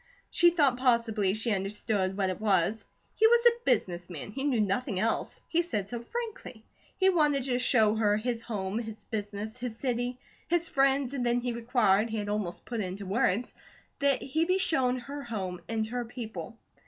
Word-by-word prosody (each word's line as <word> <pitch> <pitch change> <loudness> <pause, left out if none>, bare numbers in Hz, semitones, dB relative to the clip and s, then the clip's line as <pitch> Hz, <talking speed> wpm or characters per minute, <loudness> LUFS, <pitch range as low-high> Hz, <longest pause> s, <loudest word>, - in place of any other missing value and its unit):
She 345 - +6
thought 290 -7 +3
possibly 230 -6 +2
she 225 +1 0
understood 195 0 -1
what 190 -2 +1
it 185 - -7
was. 205 +1 +2 0.3
He 440 - +5
was 470 +1 +4
a 475 0 +4
business 175 -1 0
man; 175 +3 -7
he 270 +5 -4
knew 265 -6 +2
nothing 205 +1 0
else; 225 +3 -1
he 340 - +2
said 210 - -3
so 240 +1 -4
frankly. 425 - -6 0.3
He 380 -1 +4
wanted 295 -6 +3
to 250 -1 0
show 220 -4 +4
her 210 -2 +2
his 235 +1 -2
home, 205 -2 -3
his 220 -2 -7
business, 210 +1 -5
his 245 -3 -5
city, 245 -1 -2 0.3
his 345 0 +1
friends, 275 -1 +2
and 260 -3 -2
then 240 0 +2
he 245 0 -2
required 230 -3 +2
he 220 - -3
had 205 -1 -3
almost 205 -4 -3
put 235 -2 -4
it - - -1
into 190 +2 -6
words 205 +3 +1 0.5
that 280 -2 +2
he 315 +4 0
be 365 +2 +2
shown 260 -9 +2
her 280 +4 -7
home 190 -8 -4
and 220 -1 0
her 245 +2 -3
people. 230 -1 -7
235 Hz, 190 wpm, -29 LUFS, 210-265 Hz, 0.5 s, She